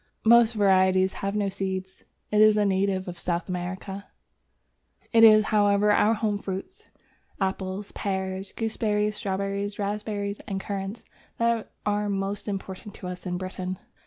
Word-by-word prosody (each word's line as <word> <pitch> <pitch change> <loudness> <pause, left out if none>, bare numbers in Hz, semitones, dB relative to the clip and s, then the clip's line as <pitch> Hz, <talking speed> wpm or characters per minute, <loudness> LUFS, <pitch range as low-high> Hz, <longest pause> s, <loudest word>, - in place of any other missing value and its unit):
Most 235 0 +6
varieties 190 -2 +3
have 200 +1 -2
no 205 -1 +1
seeds. 190 -1 -4 0.3
It 210 0 +4
is 215 0 +6
a 210 - +3
native 190 -1 +1
of 175 -1 -7
South 175 -1 -2
America. 190 +2 -5 1.1
It 225 0 +6
is, 215 -1 +8
however, 205 0 +4
our 210 +2 +4
home 210 -2 -1
fruits, 190 -1 -6 0.5
Apples, 190 +1 -3
Pears, 190 -1 -3
Gooseberries, 210 -2 -1
Strawberries, 200 +1 -2
Raspberries, 205 0 -3
and 195 -2 -2
Currants, 195 +2 -5 0.3
that 235 -1 0
are 210 0 0
most 195 +1 -2
important 195 0 -6
to - - -10
us 180 +1 -6
in 180 0 -2
Britain. 185 0 -5
200 Hz, 140 wpm, -26 LUFS, 190-210 Hz, 1.1 s, is